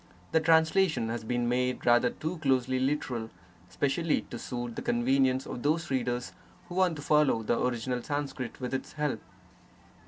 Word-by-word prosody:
The 160 - +4
translation 160 -4 +3
has 115 0 -3
been 120 +1 -1
made 125 +1 0
rather 120 0 +5
too 160 +6 -5
closely 130 -3 +1
literal, 130 -4 -1 0.4
specially 145 - 0
to - - -5
suit 120 -2 -5
the - - -4
convenience 130 +2 +2
of 120 - -6
those 160 +4 0
readers 125 -1 -1 0.4
who - - -7
want 185 -2 +2
to 145 - -8
follow 150 -7 +3
the 115 - 0
original 125 0 -1
Sanskrit 135 -3 -4
with 125 0 -4
its 130 - -4
help. 150 -7 -2
130 Hz, 160 wpm, -29 LUFS, 120-150 Hz, 0.4 s, rather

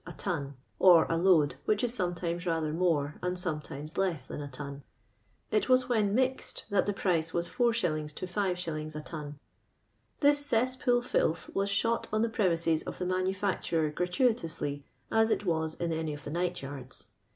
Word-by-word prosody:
a - - -7
ton 145 -7 -3 0.2
(or 175 -4 +7
a - - +2
load, 165 -5 +4
which 210 +1 +1
is 245 0 +3
soinetiines 175 -2 -2
rather 160 -2 0
more 155 -4 0
and 180 0 -1
sometimes 150 -3 -5
less 170 -9 0
than 145 - -6
a 145 - -5
ton). 140 +1 -7 0.7
It 425 -10 +1
was 255 0 +4
when 210 -4 +2
mixed 260 +1 -1
tliat 200 - +2
tlic 205 - 0
price 165 -4 0
was 170 0 0
4«. 175 -12 0
to - - -4
bs. 175 -5 -2
a 150 - -4
ton. 150 -2 -7 0.8
This 290 0 +5
ces.'ipool 245 -1 +2
filth 165 -8 0
was 200 +1 0
shot 230 +3 0
on 215 +1 +2
the 230 - +1
premise 180 -7 0
s 160 -1 +3
of - - -7
the 180 - -3
manufai 185 +2 0
turer 155 -3 0
gratuitonslj, 180 - 0 0.3
as 225 0 +4
it - - +1
wns 160 -2 -1
in 170 -1 -1
any 160 -2 -2
of 145 - -11
the 145 - -6
night 175 -1 -2
yards. 135 -2 -8
175 Hz, 180 wpm, -30 LUFS, 155-205 Hz, 0.8 s, or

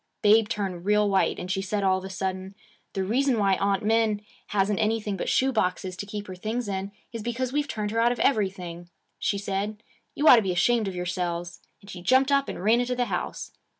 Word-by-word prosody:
Babe 215 +1 +5
turned 190 -4 -3
real 210 0 +3
white, 195 -1 +2
and 180 - -5
she 190 0 0
said 200 +1 -2
all 190 -1 +3
of - - -12
a - - -6
sudden, 190 0 -4 0.4
"The 195 - -1
reason 250 +5 +1
why 200 -2 +3
Aunt 200 0 0
Min 220 -1 +2 0.2
hasn't 200 0 +1
anything 215 -2 0
but 190 - -3
shoe 265 +1 +3
boxes 185 -4 -1
to 205 - -6
keep 205 0 -5
her 185 - -7
things 220 +5 -3
in 195 -1 -2 0.2
is 230 - -5
just - - -10
because 245 +2 -2
we've 295 0 0
turned 210 -1 -3
her 225 - 0
out 235 +1 +4
of 245 - -3
everything," 185 -7 -1 0.3
she 200 - 0
said. 200 +2 -3 0.3
"You 300 - +1
ought 250 - +10
to - - +4
be 190 -3 -1
ashamed 225 +4 +2
of 190 - -4
yourselves." 175 -1 -3 0.2
And 200 - -15
she 180 - -8
jumped 260 +8 +3
up 275 0 +2
and - - -6
ran 225 +4 +4
into 250 0 -1
the 245 0 +1
house. - - -4
205 Hz, 230 wpm, -26 LUFS, 190-230 Hz, 0.4 s, ought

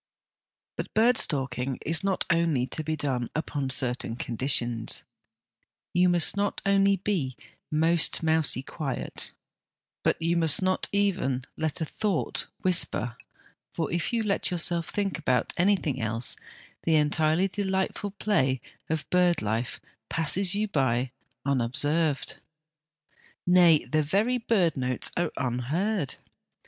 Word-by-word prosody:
But - - -4
bird 230 +2 +5
stalking 130 -2 0
is 165 +1 +2 0.3
only 165 -6 +2
to 155 - -5
be 155 +1 -2
done 130 -5 -1
upon 145 -3 -2
certain 125 -3 0
conditions. 120 -2 0 0.9
You 180 +1 +4
must 175 +1 +3
not 200 0 0
only 200 0 +4
be 175 - -2 0.2
' - - -44
most 160 +2 +2
mousy 160 -5 +2
quiet,' 140 -2 -5 0.7
but - - +1
you 170 +1 +1
must 160 -3 +4
not 185 0 0
even 180 -11 0
let 160 0 -2
a - - +1
thought 200 +2 -2 0.2
whisper, 165 -10 +2 0.6
for 165 -3 -2
if 170 -1 0
you 230 -2 +1
let 200 -2 +1
yourself 170 -1 0
think 200 -3 -1
about 130 -5 +1
anything 175 - +1
else, 115 +2 -2 0.5
the 160 - +2
entirely 155 +4 +2
delightful 190 +1 -2
play 195 -11 0 0.3
of 160 -2 -2
bird 180 -2 +3
life 110 +3 -2 0.3
passes 180 +4 +2 0.2
by 130 -5 +2
you 130 +1 -3 0.4
unobserved; 140 +4 +1 1.1
nay, 175 -3 +5
the 155 0 +1
very 210 +11 +1
bird 190 -9 +1
notes 130 -2 -1
are 175 -2 0
unheard. 140 - -1
160 Hz, 125 wpm, -27 LUFS, 130-185 Hz, 1.1 s, bird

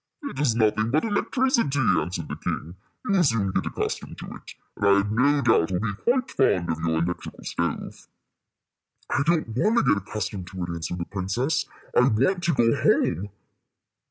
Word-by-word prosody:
"It 285 - -6
is 135 -6 +2
nothing 110 -1 +2
but 150 +6 +2
the 225 - -1
electricity," 230 - +1
answered 90 -7 0
the - - -5
king. 85 +4 -4 0.3
"You - - -1
will 190 -3 +4
soon 115 - +1
get - - -1
accustomed - - -4
to - - -8
it, - - -12 0.2
and - - -1
I 100 - +7
have 100 +1 0
no 140 +6 +3
doubt 110 -7 +3
will 90 - 0
be 105 0 -2
quite 250 - 0
fond 90 -10 +2
of 80 - -3
your 80 0 0
electrical 90 +1 -5
stove." - - -4 1.0
"I 140 - +2
don't 160 -5 +1
want 210 - +1
to - - +4
get 100 - +3
accustomed 100 -2 -5
to 90 -1 -6
it," 85 - -4
answered 85 +1 -4
the 85 - -3
princess. 110 - -1 0.3
"I - - +6
want 135 - +1
to 170 - +2
go 115 -2 +3
home." 100 +6 +2
110 Hz, 190 wpm, -25 LUFS, 90-145 Hz, 1.0 s, I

